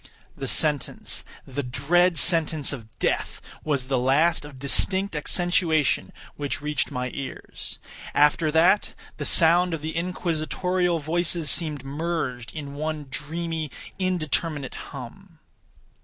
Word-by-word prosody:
The - - -5
sentence—the 145 -2 -2
dread 160 +7 +2
sentence 160 -3 +4
of 115 -6 -8
death—was 140 -4 -2
the 130 0 0
last 150 +7 +3
of 145 -2 -11
distinct 190 +8 +1
accentuation 165 0 +2 0.2
which 145 -1 -3
reached 150 +1 -1
my 125 0 -3
ears. 135 -2 -7 0.4
After 150 +2 +4
that, 170 +6 +3 0.2
the - - -4
sound 175 +1 +5
of 150 - -9
the 160 0 -4
inquisitorial 180 +1 -1
voices 165 +1 +1
seemed 150 -5 +1
merged 145 -5 -3
in 145 -2 -7
one 150 -1 -4
dreamy 160 +2 -3 0.3
indeterminate 155 -5 -1 0.2
hum. - - -10
155 Hz, 110 wpm, -25 LUFS, 145-170 Hz, 0.4 s, sound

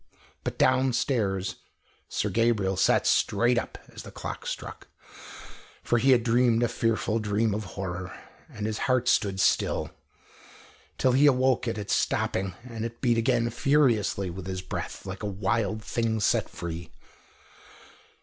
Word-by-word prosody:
But - - -4
downstairs 120 -7 +1 0.5
Sir 105 - -1
Gabriel 105 -3 +1
sat - - +3
straight 120 0 +3
up - - -7 0.2
as - - -8
the - - -10
clock - - -7
struck, - - -6 1.0
for 120 - +2
he 135 - +2
had 125 -3 +5
dreamed 120 0 +3
a - - +3
fearful 115 -1 0
dream 110 0 0
of 105 +1 -3
horror, 95 -1 -4 0.4
and 105 - -6
his 110 0 -2
heart 130 -1 +2
stood 100 -3 +2
still, - - +1 1.1
till 130 - +3
he 135 +4 +5
awoke 130 -2 +3
at 115 -1 -2
its 105 -1 -2
stopping, 95 -1 0
and 115 -3 -6
it 115 0 -6
beat 120 -3 +2
again 120 0 +2
furiously 115 -9 +2
with 90 +1 -8
his 95 -1 -4
breath, - - -6
like 95 +1 -6
a 105 - -3
wild 105 +2 -1
thing 115 -1 -1
set 100 - +1
free. 85 -1 -6
115 Hz, 150 wpm, -27 LUFS, 100-120 Hz, 1.1 s, had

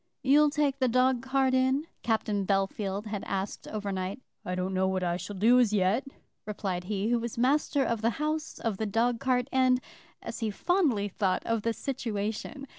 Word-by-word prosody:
"You'll 295 +3 +5
take 285 -2 0
the 260 - +3
dog 255 +1 +3
cart 265 0 +1
in?" 260 +3 +2 0.2
Captain 215 -3 0
Bellfield 195 +1 -1
had 210 -2 -4
asked 195 +1 -4
overnight. 200 0 -3 0.2
"I 180 - -3
don't 185 +1 -2
know 190 0 +2
what 190 -1 -1
I 175 -1 0
shall 200 +3 -6
do 230 +6 +5
as 230 -4 +3
yet," 205 +7 +2 0.4
replied 190 -4 -3
he 205 +2 -1
who 240 0 +2
was 235 0 -5
master 275 +3 +2
of 230 -3 -1
the 225 - +3
house, 305 +1 -2
of 225 -4 -2
the 220 - -2
dog 230 +3 +1
cart, 255 -1 +1
and, 255 -1 +3 0.4
as - - -7
he 225 -3 -1
fondly 265 - +1
thought, 190 -2 0
of 230 -1 0
the 230 - 0
situation. 225 +1 -4
225 Hz, 190 wpm, -29 LUFS, 200-260 Hz, 0.4 s, You'll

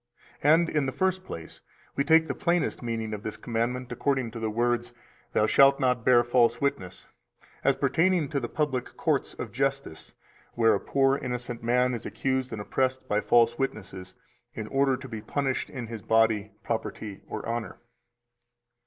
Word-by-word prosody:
257 155 +3 +6
And 170 -2 -1
in 140 - 0
the 130 - -5
first 185 0 +1
place, 80 - -9 0.3
we 140 - +1
take 160 +2 +5
the - - -1
plainest 170 -1 0
meaning 115 -2 -3
of 105 - -5
this 110 - -5
commandment 120 +2 -2
according 130 -2 0
to 115 - -7
the 110 -1 -1
words 120 +2 0 0.4
(Thou 105 - +3
shalt 135 +5 +5
not 125 -2 +1
bear 120 -1 +5
false 120 -1 +3
witness), 140 -11 -3 0.6
as - - +3
pertaining 175 -2 +2
to 140 - -1
the - - -4
public 140 -5 -2
courts - - 0
of - - -6
justice, 135 - -3 0.4
where 115 -2 +4
a 100 - +1
poor 135 0 +2
innocent 125 -1 -4
man 125 +2 +2
is 115 - -5
accused 130 -1 -1
and 110 - -5
oppressed 130 +5 -1
by 105 +1 +1
false 120 +1 +3
witnesses 95 -8 -4 0.4
in 110 - -4
order 135 -1 +2
to 130 0 -9
be 110 -3 -6
punished 135 +2 -2
in 125 -4 -6
his 115 -1 -7
body, 110 -2 +2
property, 110 -3 -4
or 110 - -6
honor. 115 -1 -3
125 Hz, 175 wpm, -27 LUFS, 115-135 Hz, 0.6 s, 257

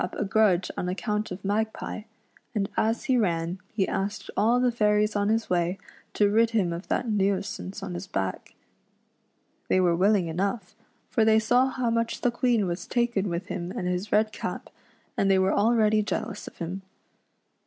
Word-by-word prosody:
97 180 - -3
R - - 0
';.\ip - - -2
a - - -5
grudge 195 -3 +3
on 180 - -2
account 210 +3 -2
of 185 +2 -8
Magpie, 215 +1 -2 0.5
and 200 -2 +1
as 225 +2 +1
he 260 -2 +2
ran 170 -4 0
he 195 -3 0
asked 200 +2 -3
all 235 +4 +3
the 250 -1 +3
fairies 210 -2 +2
on 205 0 +1
his 225 +1 +1
way 175 +1 0 0.4
to 205 - +4
rid 225 +3 +3
him 200 -7 +1
of 170 +3 -7
that 245 - -1
nuisance 195 -1 -1
on 190 -2 -5
his 175 +2 -6
back. 95 - -4 1.1
They 185 - +3
were 175 -2 +3
willing 195 +1 +3
enough, 195 +4 -2 0.4
for 225 - +3
thev 220 0 +4
saw 245 +4 +4
how 250 -3 -1
much 230 0 -1
the 245 - +2
Queen 240 -3 +1
was 175 0 -4
taken 235 -5 0
with 170 +2 -3
him 175 -1 -4
and 180 - -3
his 180 +3 -2
red 215 +1 +3
cap, - - -5 0.4
and 195 - +1
they 195 - +5
were 190 0 +2
already 215 0 +3
jealous 210 0 -4
of - - -11
him. 180 +3 -5
205 Hz, 190 wpm, -26 LUFS, 185-220 Hz, 1.1 s, they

